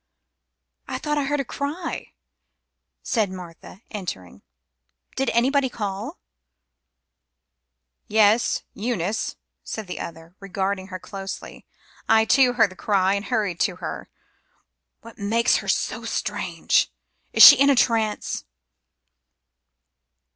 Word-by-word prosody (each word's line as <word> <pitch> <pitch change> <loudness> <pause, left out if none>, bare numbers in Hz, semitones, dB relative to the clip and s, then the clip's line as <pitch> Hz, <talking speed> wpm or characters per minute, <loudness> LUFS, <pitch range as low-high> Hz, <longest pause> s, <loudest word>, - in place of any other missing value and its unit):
"I - - -3
thought 295 -1 -1
I 280 - -1
heard 290 +1 -1
a - - -6
cry," 295 +7 -5 0.9
said 220 -5 0
Martha, 185 +2 -11
entering. 95 - -7 0.7
"Did 270 -1 0
anybody 265 +3 +2
call?" 205 -4 -5 1.9
"Yes, 215 +2 +3
Eunice," 220 -1 -2 0.3
said 220 - -6
the 180 - -7
other, 165 +1 -8
regarding 195 0 -3
her 185 -1 -6
closely. 195 +1 -8 0.4
"I, 220 0 +5
too, 255 0 +4
heard 225 -5 +3
the - - -12
cry, 195 -1 +1
and 200 +1 -2
hurried 210 -8 -1
to 185 0 +1
her. - - -7 0.9
What 230 -1 -14
makes 225 +4 +2
her - - -6
so - - -1
strange? - - 0 0.4
Is - - +7
she - - +12
in 280 +1 +5
a 280 - +5
trance?" 225 -4 0
215 Hz, 115 wpm, -23 LUFS, 190-245 Hz, 1.9 s, she